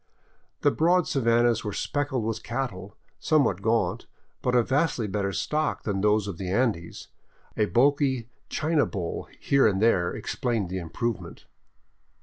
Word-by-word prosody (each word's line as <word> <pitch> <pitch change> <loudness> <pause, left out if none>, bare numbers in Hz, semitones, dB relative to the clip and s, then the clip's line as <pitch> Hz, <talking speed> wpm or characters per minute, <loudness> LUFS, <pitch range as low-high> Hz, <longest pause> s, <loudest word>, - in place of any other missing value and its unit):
The - - +4
broad 175 +2 +3
savannas 120 -6 +2
were 105 -2 -4
speckled 145 -3 -1
with 110 0 -2
cattle, 115 -7 -5 0.2
somewhat 140 - +2
gaunt, 115 +2 0 0.3
but 125 0 0
of 120 -2 +3
vastly 140 -4 +1
better 100 -1 -1
stock 150 +10 -1
than 100 -2 -1
those 105 0 +2
of 95 -5 -6
the 95 - -4
Andes, 100 -5 -1 0.5
a 105 - +2
bulky 130 0 +2 0.2
China 155 -1 +1
bull 90 -6 -4
here 140 -4 +3
and 95 -3 +1
there 95 -6 +3
explaining 115 -7 -2
the 95 +1 -3
improvement. 95 +6 -4
115 Hz, 140 wpm, -26 LUFS, 100-135 Hz, 0.5 s, The